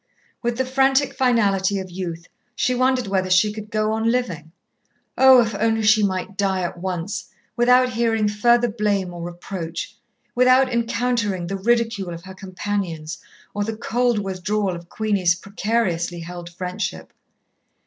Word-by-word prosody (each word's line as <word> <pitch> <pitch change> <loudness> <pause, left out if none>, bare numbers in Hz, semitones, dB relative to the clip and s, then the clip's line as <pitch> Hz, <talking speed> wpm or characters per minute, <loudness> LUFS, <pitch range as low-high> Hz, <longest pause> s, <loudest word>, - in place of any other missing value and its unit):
With 240 -1 -1
the 260 - 0
frantic 270 +1 +2
finality 205 -7 +2
of 190 -1 -6
youth, 170 -2 -6 0.3
she 255 - +1
wondered 255 0 +2
whether 190 -1 -1
she 185 +3 +4
could 215 0 -8
go 215 0 0
on 220 +1 0
living. 180 -11 -2 0.6
Oh, 260 -1 +7
if 225 -1 -1
only 225 +2 +1
she 215 +1 +5
might 190 0 -2
die 195 -2 0
at 175 0 -4
once, 180 +1 -4 0.3
without 250 +1 +4
hearing 225 -2 +1
further 235 +4 +3
blame 205 -5 -1
or 175 - -7
reproach, 175 -1 -6 0.4
without 255 +1 +4
encountering 230 -5 0
the 195 +3 -3
ridicule 215 -3 0
of 165 - -11
her 190 0 -10
companions 185 -4 -4 0.3
or 205 - -1
the 220 +1 -4
cold 240 +1 +1
withdrawal 195 0 -1
of 170 0 -11
Queenie's 200 -5 +1
precariously 195 -3 -2
held 175 0 -8
friendship. 180 +1 -5
205 Hz, 150 wpm, -22 LUFS, 185-235 Hz, 0.6 s, Oh